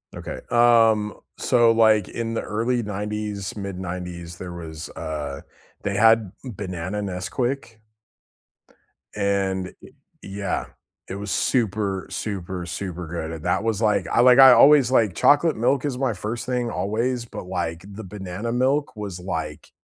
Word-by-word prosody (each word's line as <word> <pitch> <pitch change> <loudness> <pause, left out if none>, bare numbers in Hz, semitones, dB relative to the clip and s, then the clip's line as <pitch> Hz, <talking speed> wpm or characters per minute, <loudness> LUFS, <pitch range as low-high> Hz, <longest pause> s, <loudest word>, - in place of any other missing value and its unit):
Okay. - - -6
Um, 115 -3 +4 0.2
so, 120 -2 +4
like, 110 -3 +4
in 115 -1 -4
the 115 - -1
early 115 +3 -1
90s, 105 -1 -4
mid 100 -3 -5
90s, 90 -1 -6
there 90 -1 -7
was, 80 -2 -8
uh, 75 -3 -5 0.4
they 100 0 -2
had, 110 -1 +4
mm, 120 -6 -7
banana 95 +1 -4
Nesquik 115 +6 -3 1.4
and 95 -2 -1
I - - -11 0.3
yeah, 100 -1 -3 0.4
it 95 - -5
was 100 0 -5
super, 105 -5 0
super, 95 -3 -4
super 90 0 -5
good, 80 -1 -4
and 80 -1 -8
that 90 +3 +1
was 110 -2 -1
like 105 -4 +2
I - - +2
like 125 0 +7
I 135 -1 +11
always 140 -1 +7
liked 110 -8 +3
chocolate 150 - +4
milk 130 +5 +1
is 135 -4 -2
my 130 -3 0
1st 110 +5 -4
thing 125 -1 -1
always, 115 +4 -1
but, 115 - -8
like, 85 -2 -4
the 100 +2 -9
banana 95 +2 -5
milk 130 +4 +1
was, 100 -4 -5
like, 80 -5 -5
105 Hz, 150 wpm, -23 LUFS, 90-115 Hz, 1.4 s, I